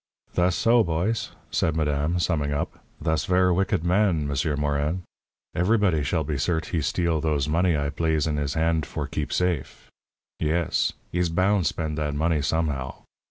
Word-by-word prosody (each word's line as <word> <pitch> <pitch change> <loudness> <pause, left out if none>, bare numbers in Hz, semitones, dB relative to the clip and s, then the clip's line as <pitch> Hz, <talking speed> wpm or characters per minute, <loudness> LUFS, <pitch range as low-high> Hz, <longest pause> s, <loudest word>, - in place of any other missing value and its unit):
"Thass 90 0 +2
so, 115 0 +4
boys," 90 +7 -1 0.2
said 80 - +1
madame, 75 +2 0
summing 80 -5 0
up. 70 - -3 0.2
"Thass 80 -1 +1
ver' 90 0 +3
wicked 95 -1 +1
man, 90 -4 +2
M'sieur 70 +2 0
Morin. 75 +4 -1 0.5
Everybody 90 -3 +2
shall 80 +3 0
be 75 -2 -3
cert' 80 +2 -1
he 80 - 0
steal 85 +1 0
those 75 -3 0
money 85 +1 +2
I 70 0 -1
plaze 80 0 0
in 75 -2 -1
his 70 -1 -2
hand 80 -2 +1
for - - -4
keep 75 - -4
safe. 90 -6 -2 0.5
Yes. 80 +2 +1 0.2
He's 90 -1 +1
boun' 95 +2 +2
spend 80 -1 -2
that 75 -1 -2
money, 80 0 +1
somehow." 70 -3 -2
80 Hz, 160 wpm, -25 LUFS, 75-90 Hz, 0.5 s, so